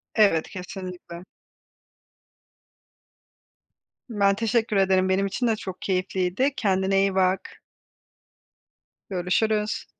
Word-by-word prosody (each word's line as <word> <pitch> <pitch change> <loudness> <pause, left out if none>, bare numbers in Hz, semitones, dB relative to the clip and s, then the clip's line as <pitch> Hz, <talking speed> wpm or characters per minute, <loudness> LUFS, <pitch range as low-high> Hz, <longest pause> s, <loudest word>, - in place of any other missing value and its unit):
Evet, 200 -8 +3
kesinlikle. 180 -2 -8 2.9
Ben 200 -3 +2
teşekkür 225 0 0
ederim, 190 -1 +3
benim 195 +1 +2
için 215 +5 -1
de 225 - +2
çok 190 -3 -8
keyifliydi, 185 +7 0
kendine 195 -3 +1
iyi 195 -1 +1
bak. 185 0 0 1.5
Görüşürüz. 210 +4 0
195 Hz, 85 wpm, -25 LUFS, 185-210 Hz, 2.9 s, Evet